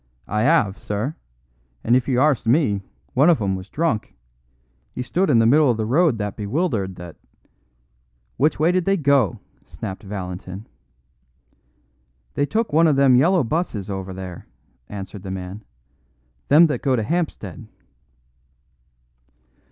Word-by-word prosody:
"I 110 +4 +1
'ave, 105 -13 +2
sir; 105 +9 -3 0.7
and 120 - +3
if 130 - +1
you 125 -3 +1
arst 145 -4 +2
me, 115 -6 +2 0.3
one 140 +5 +4
of 165 - +4
'em 95 -3 -1
was 95 +2 -8
drunk. 150 -9 -2 0.8
He 125 - -4
stood 180 +9 0
in 130 - +4
the 115 - +4
middle 145 +4 +5
of 120 - +1
the 110 - -1
road 145 +2 +2
that 105 -1 -4
bewildered 105 - -2
that 85 -2 -10 0.6
" - - -43
"Which 150 +2 +1
way 160 +3 +3
did 180 -1 0
they 195 0 +2
go?" 140 - +2 0.3
snapped 95 - -7
Valentin. 95 0 -7 1.7
"They 145 - 0
took 220 -2 -1
one 165 +2 +5
of 150 - +3
them 135 -2 +5
yellow 170 +6 +4
buses 115 - -2
over 95 -1 -5
there," 95 -2 -8 0.4
answered 100 0 -7
the 95 - -8
man; 95 +2 -6 0.8
"them 155 +4 +7
that 150 - -1
go 135 -2 +2
to 110 - -1
Hampstead." 155 - -3
115 Hz, 150 wpm, -22 LUFS, 95-150 Hz, 1.7 s, them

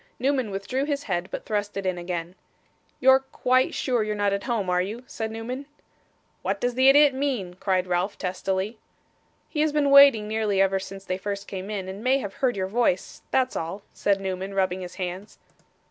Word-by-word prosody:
Newman 260 -2 0
withdrew 200 +8 -2
his 285 -1 -2
head, 180 -5 -2
but - - -6
thrust 205 -1 -2
it 195 - -3
in 185 -1 0
again. 175 -1 -4 0.7
'You're 265 0 +6
quite 255 -1 +1
sure 245 -3 0
you're 215 0 -1
not 205 -1 +1
at 200 - -3
home, 230 -6 -1
are 180 0 +2
you?' 215 +7 -5
said 225 -5 -4
Newman. 245 +5 -6 0.7
'What - - -1
does 245 0 0
the 260 +2 +5
idiot 290 0 +6
mean?' 260 -10 -2
cried 185 -2 +1
Ralph, 180 +2 -1
testily. 190 +4 -2 0.7
'He 300 - -2
has 310 0 +2
been 290 -1 +2
waiting 280 -7 +8
nearly 215 -2 0
ever 195 0 +3
since 195 0 -9
they 185 0 -2
first 200 0 -4
came 190 0 -6
in, 200 -3 -4
and 195 +3 -7
may 260 +2 +4
have 205 -8 -5
heard 250 -5 0
your 190 - 0
voice 195 -2 0
that's 260 -1 +1
all,' 170 +5 -4
said 200 -1 +1
Newman, 190 0 -4
rubbing 185 -1 0
his 180 -1 -8
hands. 185 +2 -5
205 Hz, 195 wpm, -25 LUFS, 190-255 Hz, 0.7 s, waiting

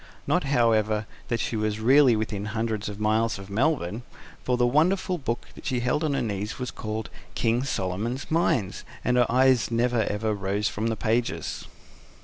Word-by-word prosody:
Not, 180 -4 +1
however, 110 -5 +2 0.2
that 120 -2 -1
she - - -2
was 110 0 -1
really 130 +2 +6
within 105 -2 -2
hundreds 110 -1 -2
of 105 0 -8
miles 110 +1 +1
of 95 0 -10
Melbourne; 115 - 0 0.4
for 125 -1 +1
the 120 - +3
wonderful 175 +7 +2
book 120 -4 -3
that - - -13
she 125 - 0
held 135 +6 0
on 150 -3 +1
her - - 0
knee 105 -2 -2
was 125 -1 -3
called 110 0 -5 0.2
KING 115 +2 +1
SOLOMON'S 115 +3 -3
MINES, 135 - +1 0.2
and 125 - +2
her 120 -2 +3
eyes 130 -1 +4
never 120 0 +1 0.3
rose 100 +1 -1
from 110 +2 -2
the 115 - 0
pages. 115 +3 -1
115 Hz, 170 wpm, -26 LUFS, 105-125 Hz, 0.4 s, really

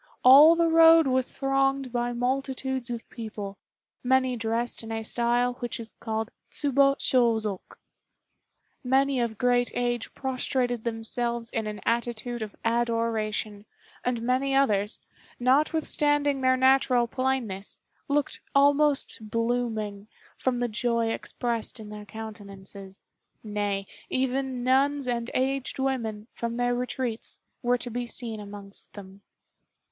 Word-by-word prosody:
All 290 +6 +9
the 335 0 +3
road 325 0 +7
was 260 -1 +1
thronged 270 -1 0
by 240 0 -1
multitudes 260 +1 -2
of 235 -1 -5
people, 210 -4 -7 0.4
many 260 0 +2
dressed 230 +1 -2
in 225 0 -8
a 225 0 -3
style 240 +2 +1
which 240 -1 -4
is 225 -1 -6
called 220 0 -3 0.2
Tsubo 275 -1 +3
Shôzok. 225 -8 0 1.1
Many 265 +1 +2
of 235 -3 -1
great 245 0 +2
age 240 -1 -2
prostrated 255 -3 -1
themselves 235 +1 -2
in 220 -2 -2
an 210 0 -5
attitude 235 0 -1
of 215 -2 -5
adoration, 225 -3 -1 0.4
and 240 -2 -1
many 260 +3 +1
others, 210 -7 +2 0.4
notwithstanding 290 +1 +2
their 260 0 +4
natural 260 -2 +4
plainness, 235 -6 -2 0.3
looked 295 +1 0
almost 280 -5 +3
blooming, 225 -3 -1 0.3
from 255 -2 -1
the 245 0 0
joy 235 0 0
expressed 235 -1 -3
in 215 -1 -9
their 210 0 -8
countenances 200 -3 -8 0.4
nay, 205 -2 -2 0.2
even 260 -1 -1
nuns 275 +2 +2
and 235 -1 -1
aged 270 +1 0
women, 235 -6 -2
from 235 0 -4
their 245 0 +1
retreats, 245 -1 -3 0.2
were 245 0 +2
to 245 0 -6
be 245 +1 -3
seen 230 -2 -4
amongst 200 -1 -7
them. 195 -1 -11
240 Hz, 125 wpm, -27 LUFS, 220-265 Hz, 1.1 s, All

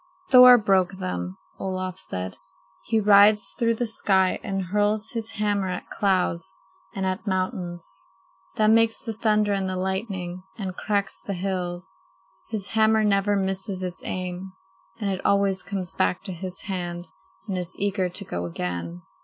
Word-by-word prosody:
"Thor 250 -1 +10
broke 195 -4 +2
them," 90 - -4 0.2
Olaf 185 -1 -3
said. 95 0 -5 0.5
"He 225 -1 +2
rides 210 0 +6
through 230 -1 +1
the 240 - -1
sky 190 -4 +2
and 195 -3 -2
hurls 210 +3 0
his 225 -2 -4
hammer 205 -2 0
at 180 - -5
clouds 185 -4 0 0.4
and 190 -1 -2
at 185 +3 -3
mountains. 180 - -3 0.5
That 215 0 +4
makes 225 0 +4
the 225 - -5
thunder 210 -1 +2
and 195 -1 -1
the 185 - -2
lightning 190 -1 -3 0.2
and 190 -4 -4
cracks 200 -1 -1
the 200 - -4
hills. 180 0 -4 0.5
His 210 -3 -4
hammer 220 0 +3
never 205 0 +2
misses 190 0 -2
its 180 -1 -5
aim, 185 +1 -4 0.5
and 200 -2 -1
it 190 - -4
always 200 -1 +2
comes 195 -2 -4
back 180 - 0
to - - -5
his 185 +1 -6
hand 175 -3 -4 0.4
and 195 - -2
is 180 -2 -2
eager 195 -2 0
to 200 +3 -4
go 85 - -4
again." 85 0 -4
190 Hz, 155 wpm, -25 LUFS, 180-210 Hz, 0.5 s, Thor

